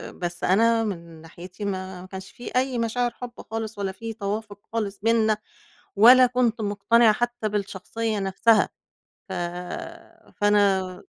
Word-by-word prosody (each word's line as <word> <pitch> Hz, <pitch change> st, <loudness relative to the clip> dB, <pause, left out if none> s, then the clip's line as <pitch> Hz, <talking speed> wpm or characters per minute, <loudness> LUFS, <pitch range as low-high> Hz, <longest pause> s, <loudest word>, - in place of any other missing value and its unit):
بس 175 Hz, -1 st, -5 dB
أنا 225 Hz, +4 st, +3 dB
من 170 Hz, -6 st, -6 dB
ناحيتي 180 Hz, +5 st, -9 dB
ما 190 Hz, -2 st, -4 dB
ما 185 Hz, -, -11 dB
كانش 190 Hz, 0 st, -9 dB
في 240 Hz, 0 st, -9 dB
أي 255 Hz, 0 st, +1 dB
مشاعر 240 Hz, +1 st, 0 dB
حب 240 Hz, 0 st, -8 dB, 0.2 s
خالص، 225 Hz, -1 st, -4 dB
ولا 195 Hz, -1 st, -2 dB
في 225 Hz, +4 st, -7 dB
توافق 205 Hz, -1 st, -4 dB
خالص 205 Hz, -3 st, -2 dB
بيننا، 220 Hz, -1 st, +3 dB, 0.6 s
ولا 250 Hz, +5 st, +8 dB
كُنت 245 Hz, -2 st, 0 dB
مقتنعة 215 Hz, +2 st, +4 dB
حتّى 240 Hz, -1 st, -2 dB
بالشخصيّة 210 Hz, +2 st, -3 dB
نفسها، 195 Hz, +4 st, +3 dB, 0.6 s
ف -, -, -6 dB, 1.1 s
فأنا 200 Hz, -3 st, +2 dB
210 Hz, 135 wpm, -25 LUFS, 190-230 Hz, 1.1 s, ولا